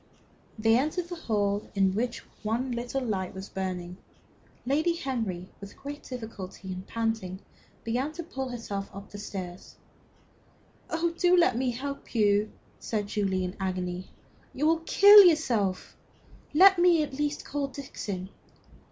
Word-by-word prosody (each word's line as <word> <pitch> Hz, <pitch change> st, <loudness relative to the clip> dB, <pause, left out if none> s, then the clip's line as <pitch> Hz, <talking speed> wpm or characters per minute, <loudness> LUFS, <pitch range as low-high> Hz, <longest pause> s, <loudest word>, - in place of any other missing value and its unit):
They 225 Hz, +2 st, +4 dB
entered 330 Hz, +5 st, -2 dB
the 350 Hz, -, -4 dB
hall 205 Hz, -8 st, -1 dB
in 195 Hz, -1 st, +3 dB
which 240 Hz, +4 st, -2 dB, 0.2 s
one 235 Hz, +4 st, -1 dB
little 245 Hz, +3 st, -2 dB
light 190 Hz, -6 st, -2 dB
was 190 Hz, +1 st, -7 dB
burning. 180 Hz, -2 st, -4 dB, 0.7 s
Lady 310 Hz, +6 st, +2 dB
Henry, 225 Hz, -, -3 dB
with 200 Hz, 0 st, -11 dB
great 290 Hz, +1 st, -7 dB
difficulty, 205 Hz, -6 st, -7 dB
and 185 Hz, +1 st, -8 dB
panting, 225 Hz, -5 st, -2 dB, 0.5 s
began 250 Hz, +6 st, -1 dB
to 340 Hz, -, -6 dB
pull 265 Hz, -5 st, -5 dB
herself 205 Hz, -5 st, -5 dB
up 200 Hz, 0 st, -10 dB
the 205 Hz, -, -8 dB
stairs. 185 Hz, -3 st, -7 dB, 1.1 s
"Oh, 335 Hz, +1 st, 0 dB
do 360 Hz, 0 st, +5 dB
let 345 Hz, -8 st, +4 dB
me 255 Hz, +1 st, 0 dB
help 275 Hz, +2 st, -6 dB
you!" 210 Hz, -1 st, +3 dB, 0.3 s
said 210 Hz, -2 st, -2 dB
Julie, 195 Hz, -3 st, 0 dB
in 180 Hz, -, -2 dB
an -, -, -18 dB
agony. 185 Hz, -1 st, -3 dB, 0.5 s
"You 290 Hz, -, 0 dB
will 325 Hz, +1 st, +4 dB
kill 410 Hz, +1 st, +10 dB
yourself. 240 Hz, -, +2 dB, 0.6 s
Let 380 Hz, +4 st, +7 dB
me 345 Hz, -3 st, +5 dB
at 290 Hz, -, -6 dB
least 295 Hz, +1 st, -2 dB
call 285 Hz, 0 st, -2 dB
Dixon." 205 Hz, -9 st, -6 dB
230 Hz, 145 wpm, -28 LUFS, 195-290 Hz, 1.1 s, kill